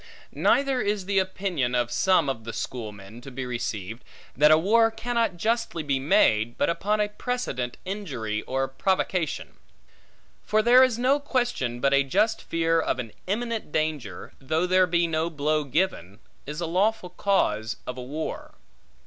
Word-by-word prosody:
Neither 270 -2 +2
is 205 -2 -1
the 195 0 +2
opinion 185 -9 -1
of 120 -1 0
some 185 -6 +3
of 130 -4 -3
the 115 0 -6
Schoolmen, 110 -2 -6
to 135 - -9
be 130 0 -5
received, 115 -3 -4 0.3
that 150 +2 +5
a 155 - +7
war 225 +7 +4
cannot 225 -3 -1
justly 225 -4 -1
be 140 -2 0
made, 120 - +3
but - - +2
upon 210 +5 -1
a 210 - +2
precedent 210 - -3
injury 135 - -3
or 135 +1 0
provocation. 180 +3 -1 0.9
For 215 0 +2
there 245 +2 +7
is 255 -3 +4
no 260 +4 +3
question, 245 - -1
but 140 +2 +2
a 140 - +5
just 210 +11 +1
fear 165 0 +1
of - - -1
an 120 -4 -5 0.2
imminent 225 -2 -2
danger, 150 - -3
though 155 +6 0
there 185 0 +4
be 170 0 +2
no 165 0 -1
blow 155 0 0
given, 135 - -1 0.3
is 150 +3 -5
a - - -1
lawful 185 +2 0
cause 110 - 0
of 125 - -5
a 130 - -7
war. 145 +5 -6
165 Hz, 165 wpm, -26 LUFS, 125-210 Hz, 0.9 s, a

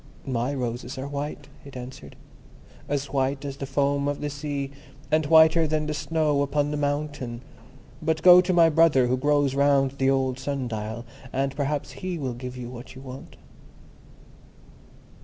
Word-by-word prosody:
"My 125 0 -1
roses 125 -1 -4
are 130 +1 -4
white," 145 0 -5 0.2
it 140 -2 -10
answered; 125 - -9 0.7
"as 140 -1 -2
white 135 +1 0
as 140 -1 -5
the 135 - -5
foam 140 0 +1
of 145 0 -2
the 145 0 -3
sea, 140 -1 -4 0.4
and 155 -1 +2
whiter 160 +1 +6
than 155 0 0
the 150 - -2
snow 150 -1 0
upon 145 +1 0
the - - -1
mountain. 145 -4 -2 0.6
But 160 0 -1
go 180 0 +9
to 185 +1 -1
my 170 -2 +6
brother 160 -5 +4
who 125 +1 +1
grows 145 0 +2
round 140 -1 +3
the 135 0 +3
old 135 -1 +1
sun 135 -1 -3
dial, 110 +1 -5 0.3
and 135 0 -1
perhaps 145 0 -2
he 185 -2 -3
will 135 -5 -3
give 125 +1 -7
you 125 -1 -6
what 125 +1 -10
you 130 - -10
want." 130 0 -10
140 Hz, 170 wpm, -25 LUFS, 130-150 Hz, 0.7 s, go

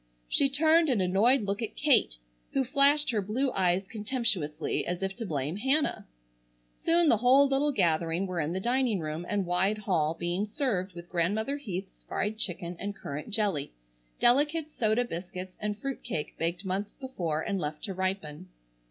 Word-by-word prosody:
She 275 - +4
turned 315 +3 +4
an 245 -6 +2
annoyed 205 +8 +4
look 200 +2 -2
at 225 - -4
Kate, 270 - +3 0.4
who 270 - +2
flashed 285 +2 +3
her 215 -3 0
blue 250 +7 -1
eyes 185 0 +1
contemptuously 210 - -1
as 175 +2 -3
if 195 0 -2
to 230 -3 -4
blame 150 +2 -2
Hannah. 270 +7 +1 0.7
Soon 335 0 +2
the 235 - +5
whole 260 +5 +5
little 275 +2 +2
gathering 170 - +1
were 180 -2 -3
in 150 +2 -2
the 185 - -2
dining 240 -1 +1
room 155 +2 -4
and 200 -2 0
wide 185 +4 +1
hall 165 -7 0
being 175 +4 -1
served 205 -6 -1
with 170 0 -9
Grandmother 210 +11 0
Heath's 195 -8 -6
fried 215 +2 -3
chicken 175 -3 -2
and 200 +1 -4
currant 145 +1 -6
jelly, 200 - 0 0.5
delicate 295 +5 +3
soda 225 -1 +1
biscuits, 185 -1 -7
and 210 -1 -2
fruit 275 +4 -5
cake 160 -11 -4
baked 170 +4 -2
months 195 +2 -3
before 175 - -3
and 195 - -2
left 150 -2 -4
to 200 -4 -3
ripen. 185 -3 -3
200 Hz, 170 wpm, -29 LUFS, 175-255 Hz, 0.7 s, the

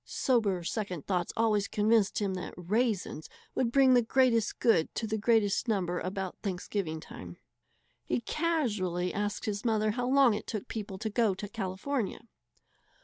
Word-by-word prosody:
Sober 210 -9 +1
second 180 -4 -3
thought 180 -3 -1
always 215 -3 +2
convinced 215 -1 +2
him 200 -2 0
that 180 -1 -6
"raisens" 200 -3 -1 0.2
would 235 -3 0
bring 265 0 +5
the 245 - +6
greatest 235 -2 +2
good 225 -9 +3
to 230 - -2
the 220 0 -2
greatest 220 0 +2
number 180 -5 0
about 190 0 -4
Thanksgiving 180 -4 -3
time. 90 - -10 0.7
He 125 -1 -1
casually 210 - -1
asked 205 0 -2
his 205 -1 -3
mother 215 -2 +2
how 245 +3 -2
long 265 -3 +5
it 210 - -5
took 215 -3 -4
people 205 -3 -5
to 220 +3 -3
go 215 -3 +2
to 205 +2 -6
California. 210 +4 -3
210 Hz, 155 wpm, -30 LUFS, 185-230 Hz, 0.7 s, the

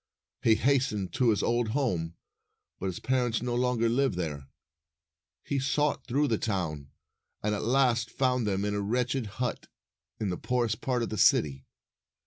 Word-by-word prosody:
He 110 - +5
hastened 125 -6 +1
to 125 -2 +3
his 105 - +2
old 120 0 +1
home, 85 - -1 0.6
but 95 - -2
his 90 - -4
parents 125 -3 0
no 125 -1 -1
longer 120 -1 +1
lived 130 -1 +1
there. 75 -6 -4 1.0
He 140 - -1
sought 145 +3 0
through 145 +4 +2
the 115 - 0
town, 80 -9 -2 0.5
and 105 0 +1
at 105 - -2
last 120 -2 +2
found 125 -3 +1
them 100 0 0
in 105 - -1
a 105 - -1
wretched 125 +3 -1
hut 125 -2 -2 0.5
in 105 - -1
the 90 - -3
poorest 120 -3 -1
part 125 -2 0
of - - -3
the 110 - -4
city. 70 -2 +3
115 Hz, 165 wpm, -29 LUFS, 100-125 Hz, 1.0 s, He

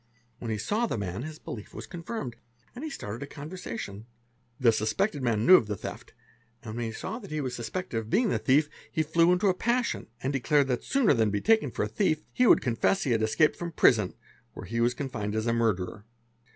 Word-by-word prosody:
When 115 - -5
he 110 - -1
saw 215 - 0
the - - -2
man, 95 +1 -3
his 155 +3 -6
belief 105 -7 -8
was - - -6
confirmed 170 - -5 0.4
and 250 - -8
he 315 - -3
started 110 - -6
a 140 - -5
conver 150 +3 -8
sation. 115 - -6 0.5
The 120 -3 +5
suspected 125 - 0
man 115 -3 +1
knew 185 +1 +10
of 110 - -1
the 105 - -2
theft, - - -8 0.5
and 110 -2 -6
when 120 0 -2
he 110 - -3
saw 220 - -5
that 200 - -11
he 155 - -2
was 130 -4 -3
suspected 120 +2 -3
of 110 -1 -8
being 230 - +3
the - - +1
thief, 145 +3 +3 0.2
he 160 - +1
flew 165 +3 +3
into 180 +3 +2
a 190 - +4
passion 240 +5 -1 0.2
and 135 +2 0
declared 140 +1 +2
that 125 - -1
sooner 265 - +3
than 110 -4 +2
be 105 0 0
taken 225 - +3
for - - -2
a - - -1
thief, 155 -7 0
he 250 - +3
would - - +7
confess 125 +11 +1
that 140 - -1
he - - +2
had 115 -1 +2
escapec 110 +8 +3
from 170 -1 -5
prison 105 -10 +4 0.4
where - - -8
he 115 +5 -2
was 120 +1 +2
confined 110 -7 -3
as 110 0 -1
a 115 - +2
murderer. 105 -2 -1
130 Hz, 235 wpm, -28 LUFS, 110-180 Hz, 0.5 s, knew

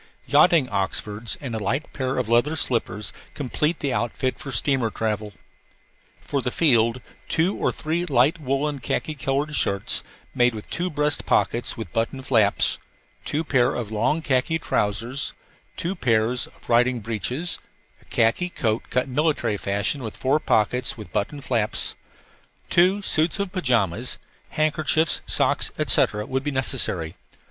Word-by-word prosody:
Yachting 170 -7 +5
oxfords 105 +3 -2
and 130 -5 -5
a 110 - -2
light 130 +9 -2
pair 130 -1 -2
of 125 -3 0
leather 120 +7 +3
slippers 110 -7 -1 0.2
complete 150 +4 -1
the 140 -3 0
outfit 130 +2 -1
for 140 - -6
steamer 130 0 +2
travel. 105 -1 -2 0.9
For 140 - -2
the 125 - -1
field, 120 -4 +3 0.3
two 170 +5 +2
or - - 0
three 170 +3 -2
light 140 +3 +3
woollen 140 +1 -1
khaki 155 +5 -2
colored 140 +2 -1
shirts, 100 -8 0 0.3
made 120 -1 +3
with 105 - -8
two 180 +2 -1
breast 150 -2 0
pockets 120 - +1
with 110 -6 -7
buttoned 125 +4 -2
flaps, 110 -6 +2 0.5
two 155 +2 -1
pairs 130 -6 +2
of 115 -3 -4
long 135 +9 +1
khaki 140 +4 +1
trousers, 115 0 -1 0.4
two 175 +3 -2
pairs 120 - +1
of - - -21
riding 120 +1 +3
breeches, 125 +10 -3 0.4
a - - -23
khaki 115 +11 +1
coat 110 -9 -1
cut 125 +1 0
military 135 -5 +1
fashion 100 +8 -1
with 110 -3 -6
four 135 +4 +2
pockets 125 0 +1
with 105 - -10
buttoned 140 +7 -2
flaps, 115 -5 -1 0.8
two 185 +4 +4
suits 160 -1 +2
of 200 -2 -2
pajamas, 120 - 0 0.3
handkerchiefs, 155 +1 +1
socks, - - +2
etc., 105 0 +3
would 130 +1 -2
be 145 - -1
necessary. 125 - 0
130 Hz, 145 wpm, -24 LUFS, 115-150 Hz, 0.9 s, Yachting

